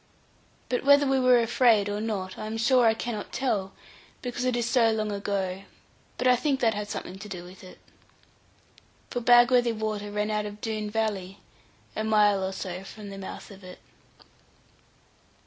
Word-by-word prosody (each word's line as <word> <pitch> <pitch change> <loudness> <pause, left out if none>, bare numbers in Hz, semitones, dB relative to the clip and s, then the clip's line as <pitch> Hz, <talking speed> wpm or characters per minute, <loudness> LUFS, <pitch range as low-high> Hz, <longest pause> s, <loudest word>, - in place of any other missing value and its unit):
But 250 - -1
whether 285 +1 +6
we 270 -1 +2
were 255 -1 +5
afraid 230 -3 +3
or 205 +1 -3
not, 195 -4 -3
I 215 - -6
am 220 +1 -4
sure 240 +1 +4
I 220 - +3
cannot 220 -2 -5
tell, 215 -7 -1 0.5
because 245 0 -3
it 255 -1 +1
is 240 -1 -1
so 235 -2 +3
long 215 -1 -1
ago; 195 -1 -3 0.5
but 255 - 0
I 250 - +6
think 270 +2 0
that 230 -3 +2
had 205 0 -5
something 190 -1 -6
to 210 +1 -9
do 180 -3 -6
with 180 +2 -13
it. 185 - -13 1.3
For 245 - -2
Bagworthy 240 0 +5
water 215 -1 -3
ran 210 +1 -1
out 210 0 -1
of 205 0 -9
Doone 215 -2 -3
valley, 205 -3 -2 0.6
a 215 - -2
mile 210 -3 +3
or 190 - -2
so 185 -1 -6
from 205 +1 -10
the 195 - -8
mouth 195 - -8
of 195 0 -14
it. 180 0 -11
215 Hz, 180 wpm, -27 LUFS, 200-240 Hz, 1.3 s, whether